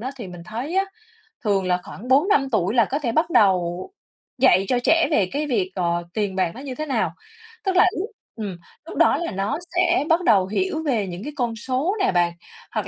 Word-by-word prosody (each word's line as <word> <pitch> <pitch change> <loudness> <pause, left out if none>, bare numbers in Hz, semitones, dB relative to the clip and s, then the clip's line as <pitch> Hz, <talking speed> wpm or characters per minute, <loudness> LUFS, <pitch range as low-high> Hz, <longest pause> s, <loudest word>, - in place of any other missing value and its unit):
á 255 +4 -4
thì 235 -6 -7
mình 175 -1 -10
thấy 245 - -4
á, 390 - +3 0.6
thường 200 -4 +1
là 180 0 +2
khoảng 230 - -10
4-5 275 +1 +3
tuổi 205 0 +1
là 230 -3 +5
có 280 +8 -2
thể 255 -6 -1
bắt 315 +7 +1
đầu 185 - +2 0.5
dạy 195 -7 +5
cho 250 - +2
trẻ 330 +4 +4
về 200 -11 +2
cái 295 +2 -2
việc, 200 -9 0
ờ, 175 -2 0
tiền 205 -3 -1
bạc 185 -3 +1
nó 255 - -8
như 270 -2 -6
thế 310 - -4
nào. 275 - 0 0.5
Tức 385 -2 0
là 360 - +7
lúc 410 +6 -3 0.3
ừm, 205 -5 -5 0.3
lúc 330 - -8
đó - - +4
là 340 -5 -3
nó 195 +6 -1 0.2
sẽ 350 -3 +3
bắt 340 +2 +3
đầu 195 - +4
hiểu 320 - -1
về 235 -10 0
những 180 +3 -6
cái 300 - -6
con 240 -4 -1
số 260 - -1
nè 390 - +2
bạn, 175 -1 +2 0.4
hoặc - - -2
235 Hz, 225 wpm, -23 LUFS, 190-305 Hz, 0.6 s, là